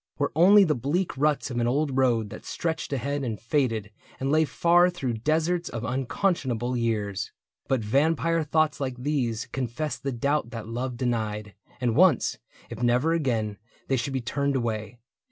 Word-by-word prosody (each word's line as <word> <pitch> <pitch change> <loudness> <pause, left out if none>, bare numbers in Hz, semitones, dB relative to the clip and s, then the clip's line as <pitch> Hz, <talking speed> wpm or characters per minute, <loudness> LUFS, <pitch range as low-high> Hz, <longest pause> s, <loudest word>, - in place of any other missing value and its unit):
Were 145 -1 0
only 195 +5 +7
the 160 -5 +2
bleak 145 +9 -1
ruts 145 0 +1
of 120 - -2
an 120 - +1
old 140 +2 0
road 120 -5 +2
That - - -9
stretched 165 -3 -3
ahead 140 +2 -2
and 115 -5 -3
faded 115 -4 0 0.3
and 135 +1 -1
lay 155 +1 +4
far 175 +3 +4
Through 135 -9 -3
deserts 160 +6 0
of 115 0 -5
unconscionable 130 - -1
years. 105 -5 -1 0.4
But 130 -3 +1
vampire 160 +8 +2
thoughts 155 0 +1
like 130 -3 -3
these 125 -4 -1
confessed 125 +1 -3
the 135 - -2
doubt 140 +1 0
That 115 -3 -7
love 120 +2 -3
denied; 110 -4 -2 0.3
and 120 -3 0
once, 175 -4 +4 0.3
if 115 0 -6
never 125 +7 +3
again, 115 -10 -1 0.3
They 135 - +3
should 130 +2 -2
be 130 - -1
turned 140 +4 -1
away. 115 -2 -2
130 Hz, 170 wpm, -26 LUFS, 115-150 Hz, 0.4 s, only